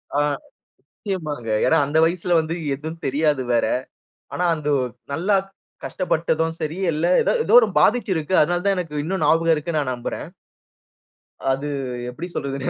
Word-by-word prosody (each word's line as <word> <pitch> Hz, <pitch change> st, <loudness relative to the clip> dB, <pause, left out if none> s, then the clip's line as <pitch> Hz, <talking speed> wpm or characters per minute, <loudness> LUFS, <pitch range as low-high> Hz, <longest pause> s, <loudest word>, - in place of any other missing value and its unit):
ஆ -, -, +3 dB, 0.7 s
நிச்சயமாங்க. 155 Hz, -, -5 dB, 0.2 s
ஏன்னா 160 Hz, -, +4 dB
அந்த 145 Hz, +3 st, -1 dB
வயசுல 175 Hz, +1 st, 0 dB
வந்து 160 Hz, +1 st, -2 dB, 0.2 s
எதும் 160 Hz, +4 st, -7 dB
தெரியாது 145 Hz, 0 st, +1 dB
வேற. 115 Hz, -, +3 dB, 0.7 s
ஆனா 180 Hz, -, -1 dB
அந்த 150 Hz, -2 st, -4 dB, 0.4 s
நல்லா 185 Hz, +8 st, +2 dB, 0.5 s
கஷ்டப்பட்டதும் 165 Hz, -2 st, -1 dB
சரி, 155 Hz, +1 st, -3 dB, 0.2 s
இல்ல 155 Hz, +2 st, 0 dB, 0.2 s
எதோ, -, -, +1 dB
ஏதோ -, -, +2 dB
ஒரு 225 Hz, -, +1 dB
பாதிச்சு 230 Hz, +7 st, +3 dB
இருக்கு. 160 Hz, +3 st, -2 dB
அதனால 175 Hz, +3 st, 0 dB
தான் 200 Hz, -1 st, +3 dB
எனக்கு 165 Hz, -4 st, -4 dB
இன்னும் 180 Hz, +1 st, -2 dB
ஞாபகம் 165 Hz, +2 st, +4 dB
இருக்குன்னு 155 Hz, +1 st, -2 dB
நான் 135 Hz, -3 st, -2 dB
நம்புறேன். 120 Hz, -, -5 dB, 1.2 s
அது 135 Hz, +2 st, -2 dB, 0.4 s
எப்படி 125 Hz, +8 st, -6 dB
சொல்றதுன்னு 135 Hz, -1 st, -3 dB
160 Hz, 145 wpm, -22 LUFS, 145-175 Hz, 1.2 s, ஏன்னா